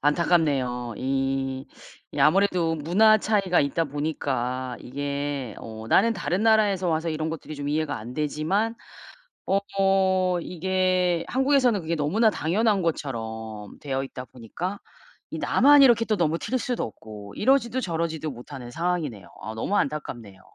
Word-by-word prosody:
안타깝네요. 140 -7 +1
이 135 0 -1 0.5
이 - - -6
아무래도 170 +1 +3
문화 210 +8 +4
차이가 200 -4 +2
있다 145 +4 0
보니까 130 -4 -3
이게 140 -2 -4
어 110 0 -9
나는 230 +3 +4
다른 190 0 -1
나라에서 205 -5 +3
와서 160 +1 0
이런 155 0 -2
것들이 160 -1 -6
좀 145 0 -4
이해가 150 -3 -1
안 120 +4 -8
되지만 155 - 0 0.7
어 195 +1 +2 0.8
이게 185 0 0
한국에서는 260 -5 +2
그게 165 +1 -2
너무나 195 +10 +2
당연한 200 +5 +1
것처럼 110 - -4
되어 135 -2 -2
있다 130 -1 -7
보니까 170 - -6 0.5
이 - - -5
나만 285 +1 +5
이렇게 235 -3 +6
또 215 - +1
너무 165 -2 +1
튈 255 - -2
수도 245 0 -2
없고 105 -2 -10
이러지도 260 0 +2
저러지도 160 - -2
못하는 125 0 -9
상황이네요. 160 - -2 0.2
어 110 +3 -6
너무 195 - -1
안타깝네요. 120 - -3
155 Hz, 325 characters per minute, -25 LUFS, 135-190 Hz, 0.8 s, 이렇게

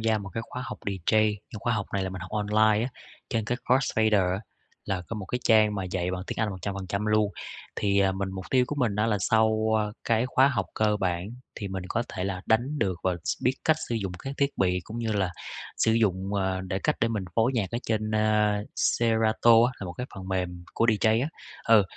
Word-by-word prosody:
gia 110 -1 +2
một 100 -1 -7
cái 115 - -2
khóa 125 - -6
học 105 - -6
DJ. 105 +3 +2 0.3
Khóa 120 - 0
học 100 -2 -2
này 100 -1 0
là 95 - -2
mình 95 -2 -6
học 90 - -8
online 105 +1 +3
á, - - -2 0.4
trên 115 -2 -1
cái 120 +3 -2
Crossfader 110 -7 +3
á, 95 - -2 0.4
là 95 -2 -2
có 115 - -4
một 95 -3 -6
cái 125 - -2
trang 110 -1 +5
mà 95 -2 -2
dạy 90 -1 -2
bằng 90 0 -3
tiếng - - -5
Anh 110 -1 +1
100% 100 +2 -3
luôn. 105 -1 +3 0.5
Thì, 100 -1 +2
à, 95 -1 +3
mình 95 0 -2
mục 95 -1 -6
tiêu 130 -1 +4
của 150 - -3
mình 115 -7 +1
á 105 +1 +2
là 105 - +2
sau 110 +1 +2 0.4
cái 115 +1 +2
khóa 130 +1 +4
học 130 - -1
cơ 105 -1 +2
bản 90 -1 -1 0.3
thì 100 -3 -5
mình 95 -1 -4
có 120 - 0
thể 90 - -4
là 95 -2 -3
đánh 125 +7 +1
được 95 -7 +1
và 90 -1 +1
s 85 - -2
biết 130 +2 +2
cách 160 -1 +4
sử 120 - -1
dụng 100 -5 -2
các 135 +7 -6
thiết 140 0 +2
bị, 90 -1 +2
cũng 115 +2 -7
như 115 -2 -1
là 95 -3 +1 0.5
sử 110 - +3
dụng, 100 -3 +1
ờ, 95 -1 0
để 95 0 -3
cách - - 0
để 115 - +3
mình 105 -4 -2
phối 115 +3 +3
nhạc 100 -6 0
ở 120 - -1
trên, 110 -1 0
ờ, 105 -1 +3 0.2
Serato 115 0 +3 0.2
á, 125 - -2
là - - -4
một 90 - -5
cái 125 +5 -5
phần 95 -1 -8
mềm 90 -2 -2
của 115 - +2
DJ 110 +1 +3
á. 140 - -1 0.4
Ừ, 110 -2 +7
105 Hz, 240 wpm, -27 LUFS, 95-115 Hz, 0.5 s, Ừ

